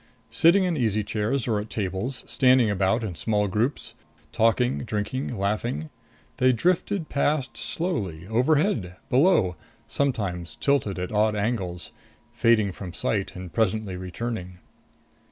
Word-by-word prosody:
Sitting 170 +11 +5
in 180 -2 0
easy 110 -6 +1
chairs 110 +5 -1
or 110 -3 +1
at 105 +1 -6
tables, 100 +5 -3
standing 130 -4 +4
about 100 +4 +1
in 100 -5 -3
small 105 +3 0
groups, 110 +8 -1 0.4
talking, 120 +3 +2
drinking, 115 +3 -3
laughing, 100 -5 -2 0.5
they 130 0 +4
drifted 175 - 0
past 140 -1 0
slowly; 100 - -2
overhead, 120 - +1 0.2
below, 125 - +4 0.3
sometimes 95 - -2
tilted 135 -9 +1
at 90 0 -4
odd 105 0 +2
angles 100 -5 -2 0.4
fading 110 -4 +3
from 90 -2 -8
sight 100 0 -2
and 90 -3 -8
presently 110 -1 0
returning. 90 0 -5
110 Hz, 125 wpm, -25 LUFS, 95-130 Hz, 0.5 s, Sitting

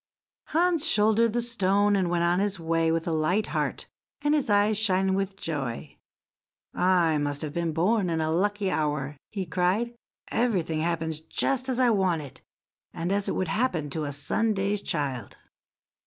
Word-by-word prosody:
Hans 335 -1 +2
shouldered 220 +1 +4
the 240 0 0
stone, 205 -3 +2
and 185 -3 +1
went 170 -1 +1
on 175 +1 +2
his 200 -2 -1
way 165 0 +1
with 165 0 -1
a - - 0
light 165 +7 +1
heart, - - -2 0.4
and 295 0 +3
his 295 -6 +1
eyes 205 +1 +3
shining 190 -3 +2
with 195 0 -1
joy. 135 -10 -4 0.8
"I 175 -4 +2
must 145 0 -2
have 150 -2 -4
been 170 -1 -1
born 185 +4 +1
in 165 -1 -1
a 155 0 0
lucky 200 +3 0
hour!" 150 -2 -1 0.2
he 195 -3 -3
cried; 185 +8 0 0.4
"everything 185 -10 0
happens 160 -1 -1
just 260 +10 -1
as 255 -1 -1
I 250 -2 +4
want 185 -7 +1
it, 135 -2 -12 0.5
and 170 +3 -2
as 200 0 0
it - - -1
would 185 -3 -1
happen 180 - -1
to 155 +1 -2
a 145 - -3
Sunday's 200 +7 -1
child." 135 - -3
185 Hz, 170 wpm, -27 LUFS, 160-210 Hz, 0.8 s, shouldered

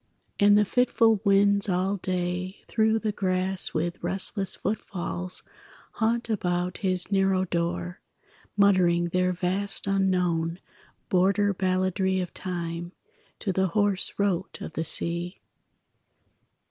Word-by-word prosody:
And 205 0 +6
the 210 - +4
fitful 225 -2 +2
winds 200 0 +5
all 190 +2 0
day 180 +1 -3
Through 220 0 +2
the 220 -1 -1
grass 185 -1 0
with 170 +2 -3
restless 190 +2 -1
footfalls 185 -3 -4 0.5
Haunt 230 +1 0
about 180 -4 -2
his 185 0 +2
narrow 195 -1 +2
door, 170 - -3 0.6
Muttering 180 -4 +3
their 180 +1 +1
vast 190 +3 -1
unknown 180 -4 0 0.5
Border 200 +2 +2
balladry 185 0 0
of 180 -2 -4
time, 175 -1 -5 0.5
To 195 - -1
the 190 +1 +1
hoarse 205 -2 +1
rote 190 -2 -1
of - - -7
the 160 - -2
sea. 170 +2 -2
185 Hz, 115 wpm, -26 LUFS, 180-200 Hz, 0.6 s, And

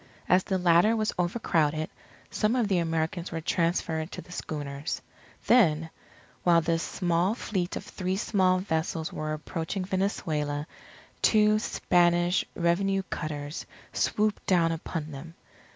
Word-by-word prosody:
As 185 +1 +4
the 190 - 0
latter 180 +5 +4
was 215 -1 0
overcrowded, 160 -5 +1 0.4
some 215 +3 +1
of 240 -4 +2
the 190 -3 +3
Americans 165 +1 -1
were 165 - -3
transferred 165 -1 0
to - - -6
the - - -16
schooners. 145 -2 -4 0.5
Then, 165 -9 +4 0.5
while 170 -1 +5
this 165 0 0
small 175 +3 0
fleet 185 -7 -2
of - - -5
three 185 0 -3
small 185 -3 +2
vessels 160 -3 -2
was 155 0 -2
approaching 165 +4 -4
Venezuela, 155 -7 -1 0.6
two 215 -1 +4
Spanish 175 -4 +2
revenue 195 +3 +1
cutters 150 0 -4 0.3
swooped 210 -1 0
down 170 -3 +3
upon 160 -1 -4
them. 155 +4 -9
175 Hz, 130 wpm, -28 LUFS, 160-190 Hz, 0.6 s, while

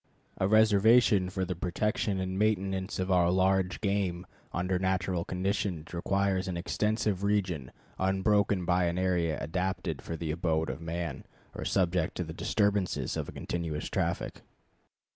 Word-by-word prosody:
A 95 - +2
reservation 110 -1 +5
for 95 0 -2
the 90 - -2
protection 100 +4 -1
and 95 0 -2
maintenance 95 -2 0
of 95 +1 -1
our 90 -2 +4
large 95 0 +2
game 95 -3 0 0.3
under 90 +1 0
natural 95 -1 0
conditions 90 -3 -2
requires 95 +2 0
an 90 -2 -2
extensive 105 +2 0
region 95 -10 0 0.3
unbroken 95 0 +2
by 90 0 +2
an 85 +1 -1
area 90 -4 +1
adapted 85 -2 -2
for 85 - -5
the 80 -1 -3
abode 80 -1 0
of - - -8
man 80 -3 -4 0.3
or - - -6
subject 90 -3 +1
to 90 - -2
the 80 -1 -7
disturbances 100 - 0
of - - -3
a - - -6
continuous 80 -3 -4
traffic. - - -2
95 Hz, 145 wpm, -30 LUFS, 85-100 Hz, 0.3 s, reservation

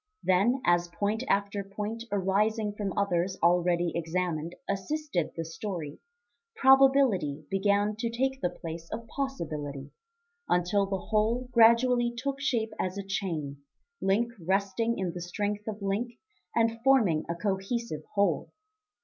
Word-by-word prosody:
Then, 215 +8 +3
as 175 0 +3
point 200 +6 -1
after 200 0 +1
point 210 +4 -5
arising 205 +2 +1
from 205 -2 -3
others 185 -2 0
already 175 0 +3
examined, 170 -1 -2
assisted 200 - -2
the 165 - -3
story, 165 -2 -5 0.6
probability 265 - +4
began 205 +2 +2
to 230 +1 -1
take 265 +3 -1
the 180 - +1
place 165 0 -8
of 230 - -5
possibility; 155 - -4 0.6
until 185 +3 +2
the 195 0 -1
whole 225 +6 0
gradually 240 +1 +5
took 275 +3 -2
shape 230 -5 0
as 185 +1 -2
a 200 - -3
chain, 165 -8 -3 0.4
link 225 +5 +2
resting 200 +5 0
in 185 -3 -2
the 175 - -6
strength 205 +4 -3
of 215 -2 -5
link 210 +5 -1 0.4
and 230 0 +1
forming 220 -13 +4
a 170 - -1
cohesive 195 -1 -2
whole. 200 0 +1
200 Hz, 130 wpm, -29 LUFS, 175-230 Hz, 0.6 s, gradually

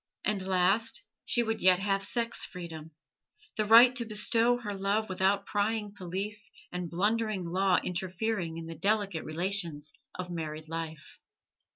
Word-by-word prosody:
And 200 -3 0
last, 190 +4 +2 0.2
she 240 - +1
would 225 -1 -2
yet 185 -1 +6
have 195 +1 0
sex 230 +2 0
freedom: 165 -3 -7 0.7
the 215 - 0
right 240 +3 +8
to 240 - -1
bestow 225 +2 +2
her 210 -4 -5
love 200 +3 0
without 190 +2 +1
prying 210 0 -1
police 200 +1 -4 0.2
and 180 -1 -4
blundering 210 +2 0
law 185 +2 +2
interfering 180 -1 -2
in 165 - -6
the 165 - -6
delicate 200 0 0
relations 165 -3 -3 0.2
of 180 -1 -5
married 155 -2 -5
life. 160 -1 -6
195 Hz, 145 wpm, -30 LUFS, 175-215 Hz, 0.7 s, right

